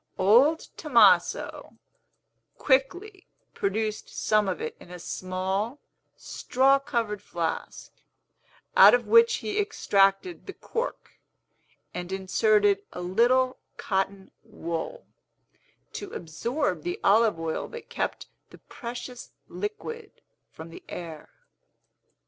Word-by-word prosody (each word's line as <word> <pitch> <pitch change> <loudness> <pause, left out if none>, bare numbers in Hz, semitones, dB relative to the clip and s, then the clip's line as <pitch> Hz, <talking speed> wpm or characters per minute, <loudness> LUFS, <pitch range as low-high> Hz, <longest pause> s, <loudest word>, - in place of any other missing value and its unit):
Old 250 +12 +5 0.2
Tomaso 220 - +3 0.8
quickly 360 +9 0 0.3
produced 215 +2 -2
some 215 -2 +1
of 185 - -3
it - - -5
in - - -15
a 180 - -8
small, 190 - -3 0.4
straw 270 +2 +2
covered 235 -8 -2
flask, 170 -5 -4 0.8
out - - +9
of - - -2
which 465 +1 +6
he 420 0 -1
extracted 205 - +1
the 390 - -6
cork, 470 +2 -5 0.7
and 180 +1 -6
inserted 200 +1 +2
a 180 - -7
little 245 +8 +2 0.2
cotton 195 -1 -2
wool, 220 - -5 0.9
to 405 - -6
absorb 180 - -2
the 175 +3 -4
olive 210 -3 +4
oil 165 -1 -3
that 470 0 -10
kept - - -3 0.2
the - - -14
precious 245 0 -8 0.2
liquid 435 +1 -6 0.4
from 160 +1 -11
the - - -12
air. 165 -3 -8
215 Hz, 105 wpm, -26 LUFS, 185-285 Hz, 0.9 s, out